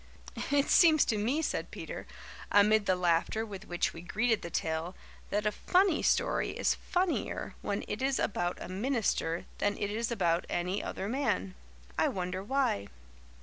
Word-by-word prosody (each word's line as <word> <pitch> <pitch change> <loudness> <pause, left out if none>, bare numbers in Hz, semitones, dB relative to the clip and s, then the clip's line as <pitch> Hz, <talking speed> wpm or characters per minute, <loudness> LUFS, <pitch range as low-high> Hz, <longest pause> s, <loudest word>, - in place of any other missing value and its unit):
"It 285 0 +3
seems 315 -4 +6
to 220 - 0
me," 260 +10 0
said - - -2
Peter, - - -7 0.4
amid 205 +1 +5
the 185 - +4
laughter 180 +5 +1
with 200 -1 -8
which 175 0 0
we 165 - -8
greeted 220 +5 +1
the 170 - -6
tale, 160 +2 -2 0.3
"that 210 +1 -1
a 210 - +3
funny 365 - +2
story - - +1
is - - +2
funnier 360 -1 -2
when 200 - -2
it 210 - -4
is 270 0 +1
about 175 -3 -1
a - - -6
minister 195 -5 -1
than 205 0 +1
it 205 0 -2
is 230 +2 -2
about 175 -6 +1
any 180 +3 -1
other 195 - -4
man. 205 - -1 0.5
I - - +4
wonder 185 0 -3
why." 255 - 0
205 Hz, 165 wpm, -31 LUFS, 180-250 Hz, 0.5 s, seems